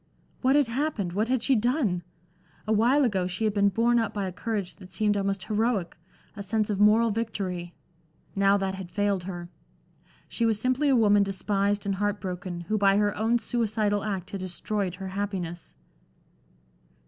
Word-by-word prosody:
What 265 +2 +3
had 290 -1 +5
happened, 230 - -2
what 210 +4 0
had 255 -1 0
she 270 - +3
done? 230 - +1 0.6
Awhile 230 +7 +3
ago 190 -6 0
she 180 +4 -4
had 215 -2 +1
been 200 -1 +3
borne 235 +4 +2
up 225 -2 -2
by 200 -2 -1
a 185 - -3
courage 200 0 -4
that 185 -1 -13
seemed 210 +1 +1
almost 195 -1 -1
heroic, 215 -4 0 0.4
a 205 - -6
sense 210 +2 -1
of 200 - -2
moral 215 +2 +5
victory. 190 -6 -3 0.6
Now 200 0 +4
that 195 -1 -2
had 190 -2 -7
failed 200 -2 0
her. 175 -2 -6 0.8
She 235 - -3
was 220 -2 +2
simply 255 +5 +1
a 270 - +5
woman 205 -3 +5
despised 200 +1 0
and 200 - 0
heart 205 +1 -1
broken, 180 -1 -5
who 215 +5 -1
by 195 0 +4
her 205 -1 +1
own 225 +2 +2
suicidal 215 -3 0
act 195 -4 -4
had 200 - -4
destroyed 185 +1 -3
her 190 0 -6
happiness. 185 -4 -4
205 Hz, 175 wpm, -27 LUFS, 190-225 Hz, 0.8 s, had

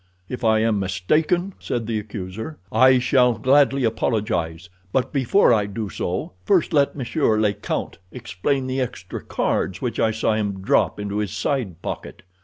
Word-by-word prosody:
"If 125 +2 -6
I 110 -1 +3
am 110 -2 +2
mistaken," 155 - 0
said 120 -2 -3
the 110 -1 -1
accuser, 105 +6 -7
"I 130 +3 +6
shall 125 -1 +3
gladly 135 +2 +3
apologize; 100 -7 -1 0.2
but 130 +3 0
before 135 +3 +4
I 105 -3 +1
do 105 +1 -4
so 90 +1 -3
first 185 -4 +2
let 140 -2 +3
monsieur 130 -3 0
le 105 -2 +2
count 85 - -4
explain 125 +3 -2
the 130 +1 -1
extra 125 - -5
cards 95 0 -1
which 120 -3 -3
I 110 - +3
saw 110 0 0
him 100 -3 -2
drop 100 - +2
into 105 0 -3
his 105 -2 -1
side 105 - -2
pocket." - - -6
110 Hz, 165 wpm, -22 LUFS, 100-130 Hz, 0.2 s, I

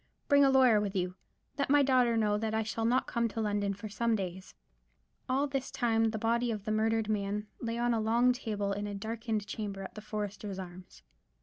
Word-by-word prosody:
Bring 285 -2 +6
a 275 - +6
lawyer 255 -5 +5
with 200 -1 -3
you. 180 -1 -1 0.5
Let 280 - 0
my 290 0 +5
daughter 250 -3 +3
know 210 -2 +2
that 220 +1 -1
I 220 - +1
shall 225 +1 -2
not 250 +3 +2
come 235 -1 0
to 225 - -6
London 205 -2 0
for 205 +2 -7
some 230 +2 0
days_." 185 -1 -6 0.7
All 270 +2 +2
this 270 -2 -3
time 225 -3 +1
the 220 0 0
body 235 +2 +1
of 210 -3 -4
the 215 - -1
murdered 220 0 +1
man 210 0 -1
lay 230 0 -3
on 240 0 +1
a 225 - +1
long 235 +3 +3
table 210 -5 -3
in 205 +1 -3
a 205 - -5
darkened 220 0 -3
chamber 200 -3 -5
at 190 - -8
the 215 - -8
Foresters' 205 -2 -5
Arms. 185 -1 -10
220 Hz, 215 wpm, -31 LUFS, 205-235 Hz, 0.7 s, Bring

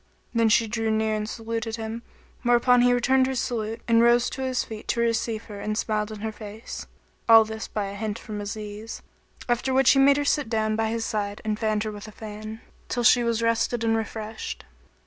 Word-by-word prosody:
"[FN#28] - - -39 0.3
Then 230 -1 +3
she 225 +1 +4
drew 225 0 -1
near 220 0 +1
and 215 0 -3
saluted 225 -1 -4
him, 225 +1 -5 0.4
whereupon 245 0 +4
he 245 0 +5
returned 260 +2 +3
her 265 - -2
salute 230 -2 -2
and 230 -1 +5
rose 240 +1 +4
to 265 - -5
his 260 -1 0
feet 220 -1 -9
to 235 - 0
receive 230 -1 0
her 205 -3 -9
and 215 +1 -2
smiled 215 -1 -1
in 215 -1 -8
her 220 0 -2
face 215 +1 -8 0.4
(all 225 -1 +9
this 220 0 -6
by 210 -2 -3
a 195 - -5
hint 210 +1 -3
from 210 -2 -6
Aziz); 210 +1 -6 0.4
after 245 +2 0
which 270 0 +6
he 270 - +4
made 280 +1 +6
her 290 - 0
sit 290 -4 +1
down 215 -1 0
by 220 0 0
his 225 0 -2
side 205 -1 -2
and 215 0 -1
fanned 215 -2 0
her 215 - -3
with 205 0 -9
a - - -9
fan, 215 +1 -8 0.3
till 240 - -1
she 240 +1 +6
was 230 -1 0
rested 230 +1 +1
and 225 0 +2
refreshed. 220 0 -5
225 Hz, 220 wpm, -25 LUFS, 215-235 Hz, 0.4 s, all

